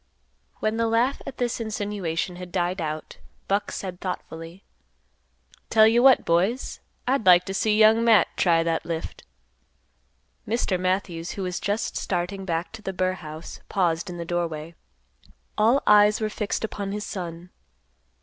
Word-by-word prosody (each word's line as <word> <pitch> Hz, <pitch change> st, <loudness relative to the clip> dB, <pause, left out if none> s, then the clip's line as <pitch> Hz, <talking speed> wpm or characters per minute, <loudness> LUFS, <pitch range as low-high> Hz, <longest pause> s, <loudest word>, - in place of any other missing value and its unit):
When 215 Hz, +1 st, 0 dB
the 230 Hz, 0 st, +1 dB
laugh 235 Hz, +4 st, +1 dB
at 260 Hz, -, -7 dB
this 245 Hz, -1 st, -1 dB
insinuation 200 Hz, -6 st, -3 dB
had 180 Hz, -1 st, -8 dB
died 180 Hz, 0 st, -1 dB
out, 155 Hz, -1 st, -5 dB, 0.3 s
Buck 200 Hz, +1 st, 0 dB
said 185 Hz, -2 st, -6 dB
thoughtfully, 170 Hz, -1 st, -6 dB, 1.1 s
"Tell 220 Hz, -1 st, +6 dB
you 230 Hz, +2 st, +4 dB
what, 265 Hz, 0 st, +6 dB
boys; 190 Hz, +10 st, 0 dB, 0.3 s
I'd 250 Hz, -5 st, 0 dB
like 180 Hz, 0 st, +7 dB
t' 190 Hz, -, -4 dB
see 210 Hz, +2 st, +1 dB
Young 220 Hz, +1 st, +6 dB
Matt 225 Hz, -6 st, +5 dB
try 165 Hz, -2 st, +3 dB
that 165 Hz, -1 st, -1 dB
lift." 165 Hz, -1 st, -5 dB, 1.3 s
Mr. 210 Hz, -4 st, 0 dB
Matthews, 185 Hz, -2 st, -2 dB
who 195 Hz, -, -4 dB
was 180 Hz, -1 st, -3 dB
just 205 Hz, +3 st, -2 dB
starting 190 Hz, +2 st, -2 dB
back 170 Hz, -1 st, -2 dB
to 225 Hz, -, -10 dB
the 195 Hz, -2 st, -4 dB
burr 185 Hz, 0 st, 0 dB
house, 155 Hz, -2 st, -9 dB
paused 175 Hz, -2 st, 0 dB
in 175 Hz, -, -6 dB
the 170 Hz, -, -5 dB
doorway. 165 Hz, -2 st, -3 dB, 0.8 s
All 230 Hz, +6 st, +3 dB
eyes 210 Hz, 0 st, +6 dB
were 215 Hz, -1 st, -1 dB
fixed 210 Hz, 0 st, -3 dB
upon 200 Hz, -2 st, -4 dB
his 210 Hz, 0 st, -4 dB
son. 175 Hz, -1 st, -6 dB
190 Hz, 155 wpm, -25 LUFS, 175-215 Hz, 1.3 s, like